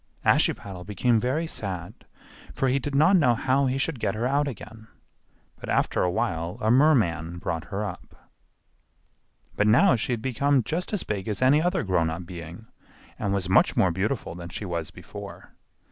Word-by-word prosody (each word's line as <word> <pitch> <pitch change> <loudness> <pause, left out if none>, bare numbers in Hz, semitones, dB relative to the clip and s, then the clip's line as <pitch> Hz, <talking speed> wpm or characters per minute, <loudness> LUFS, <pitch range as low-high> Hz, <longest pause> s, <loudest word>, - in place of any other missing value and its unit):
Ashiepattle 95 -3 +1
became 110 +4 +1
very 130 +8 -1
sad, 95 - -5 0.6
for 135 - +1
he 135 +2 +2
did 140 +1 -4
not 155 +7 +5
know 125 -8 +4
how 135 +3 +1
he 130 +1 0
should 135 -1 -2
get 105 -2 -1
her 115 +3 -2
out 140 +3 +1
again; 110 -3 -9 0.7
but - - -8
after - - +1
a 90 - +2
while 85 -1 -2
a 110 - +1
merman 100 - +3
brought 80 -1 -4
her 105 +1 -3
up. 90 -3 -8 1.4
But 105 - +2
now 130 - +5
she 115 +2 -2
had 115 - -3
become 135 +1 +1
just 165 +8 -3
as 210 -4 -1
big 100 -3 -4
as 105 +3 -1
any 140 +4 +5
other 180 +2 0
grown 90 -4 +1
up 85 +2 -5
being 85 +3 -9 0.5
and 100 -2 -1
was 100 -2 -1
much 95 - +3
more 95 - +4
beautiful 95 +2 -2
than 85 0 -8
she 100 - -6
was 85 -4 -3
before. - - -10
110 Hz, 180 wpm, -25 LUFS, 90-135 Hz, 1.4 s, not